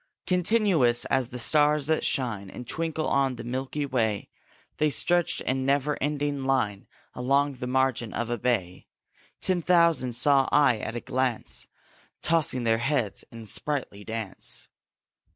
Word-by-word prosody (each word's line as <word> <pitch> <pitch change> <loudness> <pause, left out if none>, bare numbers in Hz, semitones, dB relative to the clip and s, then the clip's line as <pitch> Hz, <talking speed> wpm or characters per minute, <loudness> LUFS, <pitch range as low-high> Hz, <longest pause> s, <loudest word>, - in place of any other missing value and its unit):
Continuous 180 - +3
as 130 -2 +2
the 125 - -7
stars 150 +3 +3
that 160 +1 +1
shine 105 -7 -2
And 120 +5 -9
twinkle 160 -1 -2
on 135 -2 +1
the - - -7
milky 130 +4 -3
way, 110 -6 -1 0.5
They 155 - +2
stretched 175 +3 +1
in 130 0 -1
never 140 +2 +1
ending 145 -1 -1
line 115 -7 0 0.3
Along 140 +3 +1
the 125 -1 -6
margin 130 -3 0
of 120 0 -3
a 120 - -2
bay: 100 -8 -1 0.5
Ten 185 -2 +1
thousand 170 -8 +3
saw 135 +2 +3
I 145 -6 +4
at 110 - -5
a 120 - -3
glance, 130 -3 -2 0.6
Tossing 155 -6 +1
their 115 -1 +2
heads 120 -5 -1
in 115 -1 -9
sprightly 120 -3 -3
dance. 110 -2 -4
130 Hz, 145 wpm, -27 LUFS, 120-150 Hz, 0.6 s, I